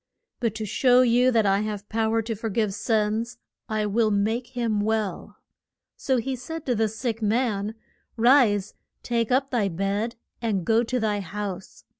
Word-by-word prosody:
But 230 -4 -1
to 220 0 -4
show 250 +4 +4
you 245 +1 +4
that 225 -4 +3
I 195 0 +3
have 210 -1 -4
pow 220 0 0
er 225 - +1
to 225 +1 -3
for 225 +1 -4
give 210 -1 0
sins, 220 +3 -1 0.3
I 215 -1 0
will 215 +2 +2
make 220 +4 0
him 225 -3 0
well. 215 -2 -2 0.6
So 265 -2 0
he 260 +3 -2
said 320 +6 -7
to 250 - +1
the 220 -1 +1
sick 225 +1 -4
man, 215 -1 0 0.4
Rise, 225 -5 +4 0.3
take 235 -1 -1
up 270 +2 +2
thy 230 -6 +1
bed, 200 +6 -2 0.3
and 205 -7 -1
go 225 +1 +3
to 250 +2 -1
thy 210 -2 0
house. 195 0 -6
220 Hz, 175 wpm, -25 LUFS, 210-240 Hz, 0.6 s, show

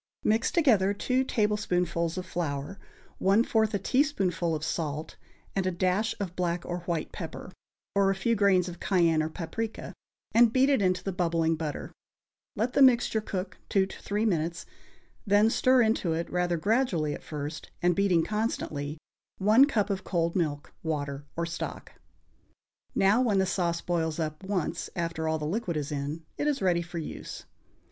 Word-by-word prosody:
Mix 220 +2 +2
together 215 - +3
two 255 +5 +1
tablespoonfuls 180 -8 0
of 185 - -3
flour, 170 0 -3 0.4
one 200 +4 +4
fourth 220 -3 +1
a - - +3
teaspoonful 190 - +1
of 155 - -5
salt 155 -1 -3 0.4
and 190 -1 0
a - - +1
dash 185 +5 0
of 185 -3 -4
black 175 -1 -1
or 175 0 -3
white 170 -3 -2
pepper, 165 +1 -7 0.4
or 200 -1 +3
a 195 - +1
few 210 +5 +1
grains 195 -4 +3
of 175 -1 -7
cayenne 170 -5 +3
or 155 - -1
paprica, 190 +7 -5 0.4
and 235 -1 +6
beat 260 +3 +4
it 270 - +3
into 185 -1 +1
the 195 - -2
bubbling 165 -3 +1
butter; 155 -2 -5 0.6
let 235 +4 -1
the - - +3
mixture 245 -4 +5
cook 190 -2 -5
two 195 - +3
or 190 - -7
three 210 +2 -1
minutes, 170 -4 -1 0.6
then 205 +3 +5
stir 255 0 +4
into 220 -6 +1
it, 165 +1 -2
rather 175 -1 +1
gradually 190 - +1
at - - -7
first, 150 0 -6
and 175 -1 +3
beating 185 -4 +3
constantly, 160 -9 -2 0.4
one 215 +7 +6
cup 215 -8 0
of 190 -1 -2
cold 170 -3 0
milk, 150 -5 -2
water 145 -3 -3
or 170 - 0
stock. 165 0 -6 1.0
Now, 200 +5 +4
when 220 -6 +2
the 190 - +3
sauce 175 -3 0
boils 160 -3 -1
up 155 +1 -3
once 185 -4 -2
after 165 -2 -2
all 160 0 +1
the 150 - -4
liquid 175 0 -2
is 145 -1 -3
in, 145 +3 -4
it 295 - 0
is 290 -2 +1
ready 180 -3 +2
for 175 0 -7
use. 160 - -6
180 Hz, 170 wpm, -28 LUFS, 165-210 Hz, 1.0 s, and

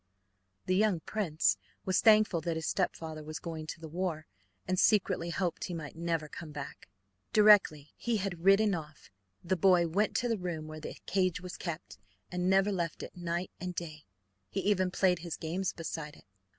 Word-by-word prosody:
The 185 - +1
young 200 -4 +2
prince 170 -7 +1 0.3
was 185 -1 +2
thankful 215 -6 +5
that 165 +1 -2
his 160 -1 -3
stepfather 160 -4 -2
was 155 0 -5
going 160 -2 -6
to 165 - -6
the 160 - -8
war, 165 -1 -3 0.4
and 185 0 +1
secretly 190 -5 +3
hoped 175 0 -1
he 180 - -4
might 155 -3 -7
never 165 -2 -1
come 155 +1 -9
back. 145 -9 -8 0.4
Directly 205 -9 +5
he 235 -2 0
had 185 -4 -4
ridden 195 +2 +5
off 155 - -7 0.3
the 185 +2 +1
boy 180 -1 +4
went 200 +6 +1
to 245 - +1
the 225 -3 0
room 170 -4 -4
where 155 0 -7
the 155 - -7
cage 185 -2 +1
was 180 0 -7
kept, 155 - -6 0.3
and 180 0 0
never 195 +2 +4
left 170 -4 -2
it - - -9
night 175 0 -3
and 180 -1 -4
day. 155 -3 -6 0.5
He - - -2
even 190 -3 +2
played 180 -1 +2
his 170 -1 -5
games 175 +3 -2
beside 160 -2 -6
it. - - -19
175 Hz, 185 wpm, -31 LUFS, 160-190 Hz, 0.5 s, thankful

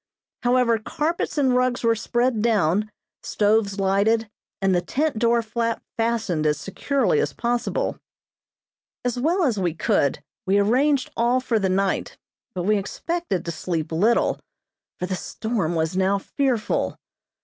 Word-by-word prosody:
However, 245 -2 +3
carpets 305 +8 -2
and 265 -3 +3
rugs 250 -1 +1
were 230 0 +4
spread 240 +1 0
down, 210 -2 +2 0.3
stoves 205 -1 +1
lighted, 205 +3 +2 0.3
and 195 -1 +2
the 175 - +2
tent 280 - -1
door 235 0 +3
flap 230 +1 -2
fastened 225 -9 0
as 150 -1 +1
securely 200 - 0
as 145 - -1
possible. 245 - -1 1.1
As 245 0 -1
well 340 +8 +2
as 240 -9 +1
we 175 -4 -1
could 140 -3 +1 0.2
we 195 +2 +3
arranged 255 +7 +2
all 240 +2 +2
for 240 -3 0
the 195 -2 0
night, 195 +1 0 0.4
but 180 - -2
we 210 +3 +3
expected 205 - -3
to 170 - -2
sleep 165 -1 -3
little, 205 +9 +2 0.6
for 180 - -3
the 185 - -3
storm 200 -4 -2
was 160 +2 -1
now 190 +1 +2
fearful. 245 +2 -1
220 Hz, 145 wpm, -23 LUFS, 190-245 Hz, 1.1 s, were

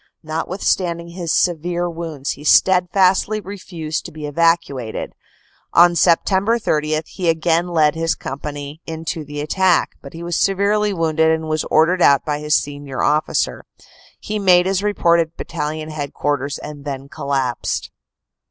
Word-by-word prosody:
Notwithstanding 170 +1 -2
his 170 -2 -4
severe 175 0 0
wounds 165 -5 -4
he 145 - -8
steadfastly 190 +5 +3
refused 180 -5 -5
to 175 - -7
be 155 -1 -7
evacuated. 145 -6 0 0.6
On 175 +1 +7
Sept. 190 +6 +2
30 155 0 0
he 180 -1 -2
again 165 +1 +1
led 155 -4 +3
his 165 0 0
company 145 +2 -7
in 160 0 -6
to 160 0 -3
the 145 0 -6
attack, 180 +3 +2
but 140 +2 -11
was 170 +1 -4
severely 200 +3 +2
wounded 160 -3 +1
and 160 0 0
was 155 0 -1
ordered 175 +4 +3
out 140 -3 +5
by 150 -1 -1
his 150 0 +1
senior 145 -2 -3
officer. 150 +1 0 0.6
He 215 0 -4
made 180 -3 +5
his 190 0 0
report 175 -5 +2
at 165 0 -2
Battalion 155 -1 -4
Head 145 -2 -5
quarters 145 -1 -1
and 145 -1 -9
then 140 -1 -5
collapsed. 135 -4 -2
160 Hz, 145 wpm, -19 LUFS, 150-175 Hz, 0.6 s, On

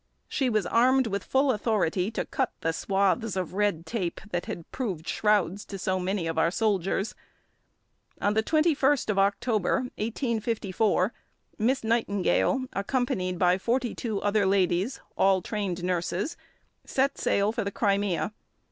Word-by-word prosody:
She 265 -3 0
was 215 -4 +1
armed 255 +6 +4
with 200 -3 -2
full 270 +1 +2
authority 205 -5 0
to 225 - -3
cut 265 -3 -1
the 165 - +1
swathes 195 +4 0
of 180 -2 -3
red 200 -5 0
tape 185 -2 -3
that 175 0 -2
had 170 - -5
proved 190 - -4
shrouds 205 -2 +1
to 195 - -7
so 185 0 -1
many 185 0 -1
of 165 0 -1
our 165 - +4
soldiers. 195 0 0 1.1
On 205 - +1
the 220 - +3
21st 290 -3 +2
of 195 - 0
October 205 +2 +1 0.2
1854 220 -3 0 0.5
Miss 250 +5 +1
Nightingale, 225 +3 +1
accompanied 200 -4 -1
by 180 +1 +3
forty 240 +3 0
two 220 -4 -3
other 205 -1 +2
ladies, 190 +4 +1 0.2
all 190 -1 +4
trained 195 -5 -3
nurses, 180 - -1 0.5
set 275 +1 0
sail 200 +1 +2
for 230 0 -2
the 200 - -2
Crimea. 200 -3 0
205 Hz, 145 wpm, -27 LUFS, 185-230 Hz, 1.1 s, armed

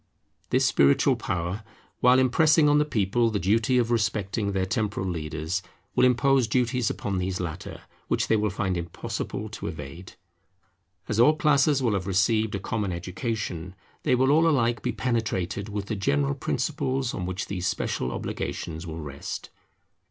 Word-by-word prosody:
This - - +3
spiritual 70 0 +4
power, 90 +4 -3 0.4
while 125 +1 +6
impressing 150 +4 +4
on 145 0 +5
the 150 - +3
people 115 -2 +1
the 110 - -1
duty 110 +7 +2
of 120 -1 +1
respecting 105 -2 0
their 95 -1 0
temporal 105 -1 -1
leaders, 80 +1 -3 0.3
will - - +5
impose 125 0 +3
duties 125 0 +1
upon 100 -2 -2
these 90 0 -2
latter, 85 -1 -5 0.3
which - - 0
they 115 - +3
will 105 0 +1
find 95 -1 -1
impossible 85 -1 -4
to - - -6
evade. 80 +4 -8 0.9
As 105 - -1
all 150 +6 +6
classes 145 -2 +3
will 115 -4 +2
have 95 -1 -2
received 105 +3 +2
a - - -2
common 100 0 -2
education, 90 0 -4 0.3
they - - +2
will 130 +2 +3
all 160 +3 +5
alike 120 -6 +1
be - - -1
penetrated 105 -5 -2
with 100 -1 -3
the 110 - -3
general 70 -7 +1
principles 130 - -1
on 90 - -3
which 95 +1 -3
these 90 -2 -3
special 65 - -1
obligations 80 +5 -4
will 80 0 -6
rest. 70 -2 -6
105 Hz, 160 wpm, -26 LUFS, 90-120 Hz, 0.9 s, while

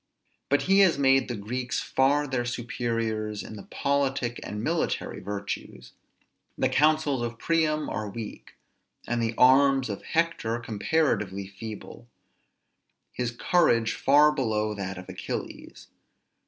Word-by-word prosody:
But 145 - +2
he 195 +1 +4
has 190 -6 +5
made 135 -1 +4
the 120 - -3
Greeks 120 +4 -3
far 140 +3 +2
their 130 -3 -1
superiors 115 -3 -3
in 110 - -9
the 100 - -8
politic 135 -4 -1
and 105 +1 -5
military 165 +5 -1
virtues. 100 0 -6 0.7
The - - +1
councils 150 -3 +2
of 120 -1 -4
Priam 155 +1 +1
are 105 0 -3
weak; 110 +1 -8 0.5
the 115 -1 -1
arms 135 0 +5
of 100 - -4
Hector 165 -9 0
comparatively 105 - -1
feeble; 105 +4 -9 1.0
his 125 -1 -2
courage 120 -3 +2
far 150 +2 +5
below 110 -7 -1
that 95 -2 -5
of 90 - -9
Achilles. - - -7
120 Hz, 125 wpm, -27 LUFS, 110-140 Hz, 1.0 s, has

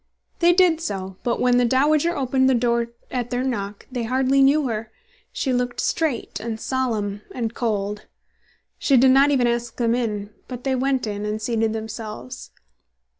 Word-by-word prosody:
They 345 0 +5
did 350 -3 +4
so; 190 - -4
but 235 - -1
when 250 0 +3
the 245 - +4
"dowager" 295 +7 +2
opened 260 0 +2
the 260 - +4
door 235 0 +1 0.2
at 245 -2 -2
their 245 0 -1
knock, 205 -6 -3
they 250 -2 -3
hardly 260 +3 +2
knew 280 +1 +4
her. 220 -1 -3 0.4
She 265 - -1
looked 245 0 -1
straight, 300 -11 -1
and 220 0 -4
solemn, 220 -6 -2
and 230 -2 -2
cold. 210 -3 -2 0.7
She 275 - +3
did 260 +2 +6
not 275 +2 +5
even 265 -4 +3
ask 240 0 -1
them 235 -1 +1
in; 210 -4 -2 0.2
but 250 -1 -7
they 270 - 0
went 260 0 0
in 205 -1 -4
and 210 +1 -2
seated 225 0 0
themselves. 215 - -7
240 Hz, 175 wpm, -23 LUFS, 220-265 Hz, 0.7 s, did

